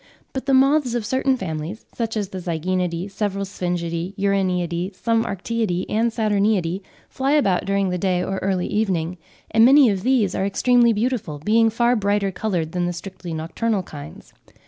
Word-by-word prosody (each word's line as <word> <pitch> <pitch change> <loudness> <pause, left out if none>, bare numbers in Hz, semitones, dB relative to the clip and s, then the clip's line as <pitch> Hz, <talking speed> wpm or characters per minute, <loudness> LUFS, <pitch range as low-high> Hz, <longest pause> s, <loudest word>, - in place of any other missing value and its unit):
But 265 0 -5
the 275 - +3
moths 270 -2 +3
of 235 -3 -2
certain 260 +2 +1
families, 165 +2 -5
such 225 -2 -3
as 205 -3 -2
the 190 - -6
Zygaenidae, 175 +1 -2
several 200 -1 -2
Sphingidae, 175 -1 -3
Uraniidae, 185 -2 0
some 230 +3 +1
Arctiidae 200 -2 -2
and 225 +2 +2
Saturniidae, 205 -5 +1 0.3
fly 270 +1 -1
about 200 -12 +2
during 195 0 +1
the 180 0 -2
day 180 -1 +1
or 190 0 -2
early 190 -2 0
evening, 180 -5 -1 0.3
and 225 +1 +5
many 265 -1 +7
of 195 -2 -2
these 235 -5 +2
are - - -1
extremely 240 +4 +3
beautiful, 220 - -1
being 225 +9 +3
far 235 +2 +2
brighter 200 -2 +1
coloured 175 -6 -2
than 175 0 -1
the 175 - -2
strictly 185 0 -8
nocturnal 185 +6 -1
kinds. 145 -4 -11
195 Hz, 170 wpm, -22 LUFS, 180-230 Hz, 0.3 s, many